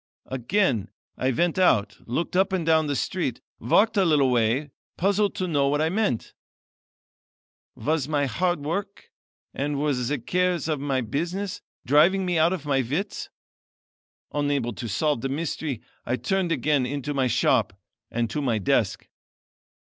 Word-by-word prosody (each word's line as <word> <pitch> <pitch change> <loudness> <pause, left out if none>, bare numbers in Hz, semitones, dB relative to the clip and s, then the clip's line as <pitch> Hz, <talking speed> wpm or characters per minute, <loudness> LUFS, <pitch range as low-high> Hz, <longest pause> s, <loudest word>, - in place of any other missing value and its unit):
"Again 130 - 0 0.3
I 130 - 0
went 170 +7 +1
out, 120 - +3
looked 160 +10 -2
up 190 +1 +3
and 185 -4 -1
down 160 -1 +3
the 145 - -1
street, 165 -6 -2 0.2
walked 210 - +3
a 195 - +5
little 145 -6 +3
way, 125 +5 +1 0.3
puzzled 200 +2 +1
to 185 - -2
know 145 -4 +2
what 145 +1 +1
I 160 +1 +2
meant. 180 - -1 1.4
Was 150 -2 -1
my 145 -2 +1
hard 175 +6 0
work 200 +6 -4 0.4
and 145 0 -2
were 150 0 +1
the 125 +3 -1
cares 180 +5 0
of 155 -3 -1 0.3
business 180 +6 -2 0.2
driving 175 +8 +4
me 175 -2 +1
out 165 +2 +4
of 180 -6 -3
my 135 -2 +2
wits? 150 - -3 1.0
Unable 145 -5 0
to 115 +1 -6
solve 145 +5 0
the 135 - -2
mystery 145 -3 -3 0.2
I 125 - -1
turned 190 +4 -1
again 145 -3 +1
into 145 +1 -3
my 135 -2 +1
shop 120 - +1 0.3
and 120 0 -1
to 150 - -2
my 120 -5 +1
desk. 100 - 0
150 Hz, 155 wpm, -25 LUFS, 130-180 Hz, 1.4 s, a